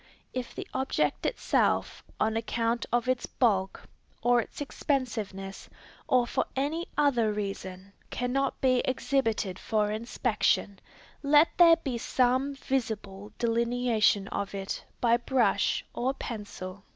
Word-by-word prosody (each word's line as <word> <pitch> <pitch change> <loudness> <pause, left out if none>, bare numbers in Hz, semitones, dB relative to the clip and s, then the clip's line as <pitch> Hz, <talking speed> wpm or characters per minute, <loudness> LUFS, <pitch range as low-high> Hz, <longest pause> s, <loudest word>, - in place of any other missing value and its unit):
If 255 -2 -5
the - - -6
object 265 0 0
itself, - - 0 0.2
on 220 +1 +1
account 230 +1 -1
of 240 +1 +1
its 255 -1 0
bulk, 195 -6 0 0.4
or 245 0 +4
its - - -10
expensiveness, 225 -9 -3 0.4
or 250 -1 +4
for - - -1
any 300 +6 -1
other 250 -7 +3
reason, 195 -2 -5 0.2
cannot 265 +2 -1
be 255 -1 +4
exhibited 240 -7 0
for 210 -2 0
inspection, 215 -2 0 0.4
let 295 +2 +5
there 335 -2 +8
be 270 -7 -4
some 260 +4 +1
visible 215 -7 -3
delineation 235 -3 +2
of 200 0 -3
it 195 0 -4 0.2
by 235 -1 +4
brush 240 -4 +1
or 260 +3 -1
pencil. 205 -5 -7
235 Hz, 120 wpm, -28 LUFS, 210-260 Hz, 0.4 s, there